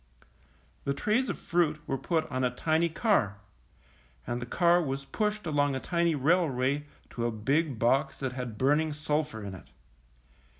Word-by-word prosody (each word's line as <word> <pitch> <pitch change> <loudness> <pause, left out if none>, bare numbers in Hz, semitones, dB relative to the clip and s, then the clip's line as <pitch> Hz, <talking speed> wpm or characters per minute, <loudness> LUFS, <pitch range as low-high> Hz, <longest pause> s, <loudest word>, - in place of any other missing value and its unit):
The 140 - -1
trays 225 - +1
of - - -2
fruit 165 -3 +1
were 135 - -1
put 160 +3 0
on 130 0 -1
a 125 - +3
tiny 160 +6 +1
car, 165 - +1 0.9
and 120 +1 -3
the 120 - -5
car 175 +5 +4
was 140 -3 -3
pushed 210 +4 -2
along 145 -3 +1
a - - -1
tiny 170 +1 +1
railway 145 -2 +1 0.2
to 120 -1 -1
a - - -1
big 135 +6 0
box 130 +4 +1
that 130 -2 -1
had 125 -4 -5
burning 150 +5 +2
sulphur 150 -5 -2
in 100 -1 -6
it. 95 - -11
145 Hz, 165 wpm, -29 LUFS, 130-165 Hz, 0.9 s, car